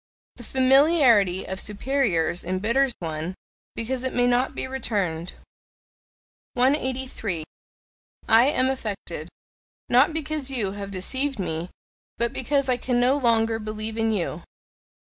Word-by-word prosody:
The 240 - -10
familiarity 260 - +4
of 190 0 -4
superiors 210 - 0
embitters 225 +9 +1
one, 160 +2 -5 0.4
because 250 +3 -3
it 260 - -2
may 245 - +3
not 245 +1 +1
be - - -1
returned. 195 -10 -2 1.2
183. 255 - 0 0.8
"I 225 +2 +6
am 260 -2 +2
affected, 200 -10 -6 0.6
not 255 +6 +5
because 310 -3 -2
you 230 -8 0
have 200 0 -6
deceived 260 +9 -2
me, 170 -2 -3 0.5
but 235 0 0
because 275 +2 0
I 250 -1 +2
can 245 0 0
no 250 +3 +3
longer 225 -4 +2
believe 215 0 -5
in 225 0 +1
you." 175 -5 -2
235 Hz, 125 wpm, -24 LUFS, 195-265 Hz, 1.2 s, I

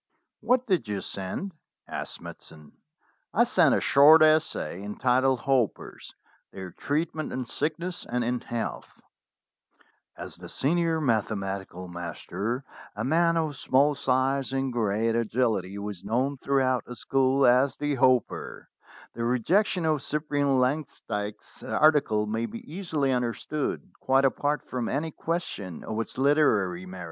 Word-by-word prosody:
"What 250 0 +2
did 180 - 0
you 105 -1 -2
send 95 - -5 0.2
?" - - -63
asked - - -5
Smithson. 75 -2 -12 0.6
"I - - +6
sent - - +4
a - - 0
short 155 +3 +7
essay 155 - +2
entitled 125 +5 +1
'Hoppers; 125 -5 -1 0.4
their 95 -2 -8
treat 155 - -2
ment 155 -1 -4
in 130 -1 -3
sickness 165 +8 -3
and 125 0 -1
in 120 +1 -1
health/ 120 -1 -5 0.6
' - - -37
As - - -8
the - - -10
senior 165 +3 +1
mathematical 100 - -2
master, 90 - -4 0.3
a 105 - -3
man 165 +5 +2
of 155 -3 -1
small 140 +3 +3
size 135 0 0
and 135 -1 -1
great 115 0 +1
agility, 110 -4 0
was 100 -2 -6
known 125 +7 0
throughout 130 -2 +1
the 125 - -8
school 135 +1 +2
as 125 +2 +4
"The 145 0 -1
Hopper," 130 -3 +1 0.4
the 115 - -4
rejection 165 - +1
of 155 -3 +1
Cyprian 145 -2 0
Langsdyke's 125 -6 -3
article 145 -9 +3
may 110 +2 -2
be 230 - -8
easily 160 -6 -1
understood, 125 +4 -2
quite 135 +1 +3
apart 145 +2 0
from 125 -3 -3
any 155 +4 -2
question 150 - -4
of 110 0 -4
its 115 - -4
literary 110 - +2
merits. 95 0 -9
130 Hz, 140 wpm, -27 LUFS, 110-150 Hz, 0.6 s, short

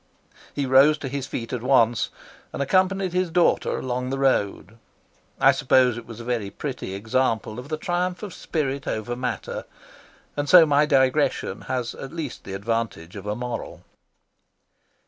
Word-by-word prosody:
He 140 - 0
rose 135 +4 +6
to 145 - -6
his 135 0 -4
feet 115 -2 -5
at 125 - -2
once, 120 -3 +3 0.4
and - - -6
accompanied 185 +5 +1
his 180 -1 +1
daughter 170 +1 +2
along 125 0 -3
the 135 - -2
road. 115 -4 0 0.6
I - - +7
suppose 125 -2 +3
it 120 -1 -8
was 115 -1 -9
a - - -7
very 115 -4 -2
pretty 125 -3 -5
example 110 +1 -1
of 125 +3 -9
the 155 - -2
triumph 180 +4 -2
of 205 - -6
spirit 140 -3 -3
over 110 +3 -2
matter, 125 0 -4 0.7
and 145 -1 -2
so 175 -3 +9
my 150 0 +3
digression 135 0 +2
has 125 -2 -2
at 135 +2 -9
least 155 -7 -6
the 95 - -6
advantage 100 -4 -3
of 100 0 -8
a 105 - -1
moral. 120 0 -5
130 Hz, 165 wpm, -24 LUFS, 115-145 Hz, 0.7 s, so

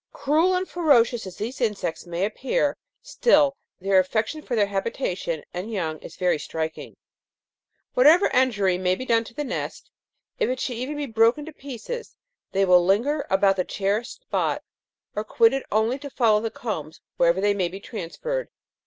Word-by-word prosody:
" - - -66
Cruel 320 +6 +3
and 370 +1 -1
ferocious 245 - +3
as 185 - -9
these 235 +5 -5
insects 210 -7 -2
may 175 +2 -1
appear, 260 +6 0 0.3
still 295 - +3 0.2
their 195 0 +3
affection 220 - -1
for 250 - -3
their 210 -2 +4
habitation 195 - -3
and 185 +6 -5
young 160 -7 -2
is - - -11
very 180 -4 +1
striking. 160 +1 -5 1.0
Whatever 310 +9 +6
injury 205 -8 +2
may 185 0 +2
be 255 - -6
done 230 -2 +3
to 230 - -13
the 295 - -2
nest, 260 - -5 0.5
if - - +2
it 255 0 -2
should 255 - -2
be 235 - -5
even 290 0 -4
broken 230 +6 +3
to 320 - -9
pieces, 285 - -7 0.4
they 195 0 +2
will 180 -1 +6
linger 245 +11 +1
about 195 0 +3
the 185 - +2
cherished 210 - -2
spot, - - -1 0.5
or - - -1
quit 455 -1 +4
it 270 - -3
only 220 +5 +1
to 285 0 -7
follow 220 -5 +3
the 225 - -2
combs 160 -10 -5 0.2
wherever 170 +2 +3
they 205 +1 +3
may 190 -3 0
be 185 +3 -8
transferred. 255 - -4
225 Hz, 180 wpm, -24 LUFS, 190-275 Hz, 1.0 s, Whatever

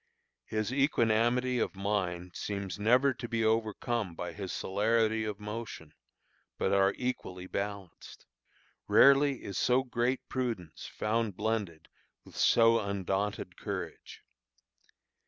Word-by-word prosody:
His 110 +2 -2
equanimity 125 -2 +2
of - - -1
mind 90 -3 -2
seems 100 -2 -4
never 125 +6 +4
to 120 - -7
be 115 -1 0
overcome 110 -3 0
by 85 0 -5
his 95 -1 -5
celerity 110 +2 +1
of 105 -1 -4
motion, 105 -7 -7 0.6
but 95 - 0
are 100 0 +3
equally 95 -8 -4
balanced. 100 -1 -6 0.6
Rarely 140 -1 +5
is 100 - -4
so 125 +1 +3
great 125 0 -1
prudence 115 -11 -4
found 110 -2 -1
blended 105 -7 -2 0.4
with - - -15
so 115 0 +5
undaunted 100 -1 -2
courage. 95 -6 -6
110 Hz, 115 wpm, -31 LUFS, 95-120 Hz, 0.6 s, Rarely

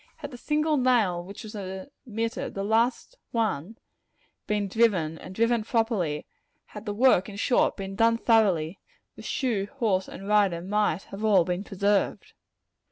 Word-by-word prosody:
Had 290 -2 -8
the 245 - -9
single 300 +3 +1
nail 225 -9 +2
which 195 +3 -10
was 215 0 -9
omitted 215 +3 -5
the 195 - -2
last 230 - 0
one 220 -3 -2 0.7
been 210 -1 0
driven, 185 -7 +1
and 185 - -10
driven 230 +1 +2
properly; 215 -10 0 0.4
had 210 +1 -11
the 205 - -1
work, 220 -5 +4
in 200 - -9
short, 235 +4 +2
been 195 -1 -6
done 230 +2 +3
thoroughly, 195 -8 +2 0.4
the - - -11
shoe, 225 -7 -1
horse 205 -8 0
and 195 - -9
rider 205 -5 +3
might 195 -1 -1
all 210 0 +2
have - - -1
been 180 +2 -2
preserved. 200 0 0
210 Hz, 155 wpm, -26 LUFS, 190-230 Hz, 0.7 s, work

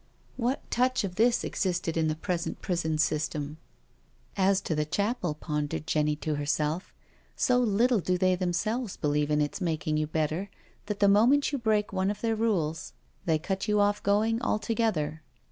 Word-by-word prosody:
What 255 +2 -2
touch 255 0 +2
of 190 -3 -3
this 230 +5 +3
existed 175 -4 -1
in 160 -1 +2
the 155 - 0
present 170 +1 -3
prison 165 -3 -1
system? 155 -1 -1 0.4
" - - -36 0.2
As 195 - +2
to 155 -5 -1
chapel," 200 0 -1
pondered 150 -1 -3
Jenny 150 0 +1
to 150 0 -3
herself> 150 +4 -1 0.2
" - - -34
so 250 0 +3
little 235 +1 +3
do 180 0 0
they 185 +1 +3
themselves 190 +5 -1
believe 150 -1 0
in 150 0 +2
its 145 +6 -2
making 155 -3 -1
you 155 0 0
better 160 +5 -1 0.4
that 210 -1 -4
the 200 - +6
moment 240 +10 +4
you 280 - -1
break 215 -3 +1
one 190 0 +1
of 205 0 -4
their 225 -1 +1
rules 175 -8 -1 0.3
they 160 -2 +3
cut 190 +4 -3
you 210 -1 +2
off 205 0 +2
going 220 +3 +2
altogether. 215 -10 0
185 Hz, 175 wpm, -28 LUFS, 155-215 Hz, 0.4 s, the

